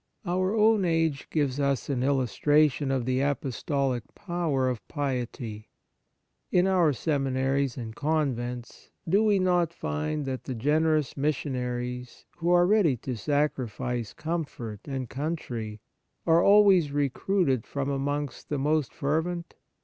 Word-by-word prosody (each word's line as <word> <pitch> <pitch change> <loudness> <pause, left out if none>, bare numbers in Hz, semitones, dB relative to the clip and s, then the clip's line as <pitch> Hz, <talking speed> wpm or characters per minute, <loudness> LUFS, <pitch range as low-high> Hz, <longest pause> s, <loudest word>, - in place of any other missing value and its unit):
Our 185 +3 0
own 215 -1 +4
age 165 -5 0
gives 145 -3 0
us 140 -5 0
an 135 -3 -1
illustra 140 +3 +3
tion 140 +1 -3
of 130 -3 0
the 130 +1 +1
apostolic 135 -1 -1
power 165 -8 -1
of 125 -3 -3
piety. 125 -6 -4 0.8
In 180 0 +4
our 180 -5 +4
seminaries 135 -2 0
and 115 -3 -6
convents, 125 -6 -2 0.2
do 195 +6 +3
we 210 -2 +4
not 180 -3 +2
find 75 - -3
that 130 -1 -4
the 130 - -4
generous 150 +3 +1
mis 145 +2 +1
sionaries, 125 -2 -4
who 170 0 -1
are 175 0 +5
ready 185 - +3
to 125 +2 -4
sacrifice 125 -3 -1
comfort 150 -10 -4
and 135 -3 -3
country, 120 -7 -4 0.4
are 165 0 +5
always 195 -7 +6
recruited 140 - 0
from 140 -1 -3
amongst 145 0 -3
the 145 - -1
most 150 0 0
fer 150 +3 +1
vent 170 0 -5
140 Hz, 135 wpm, -27 LUFS, 125-165 Hz, 0.8 s, always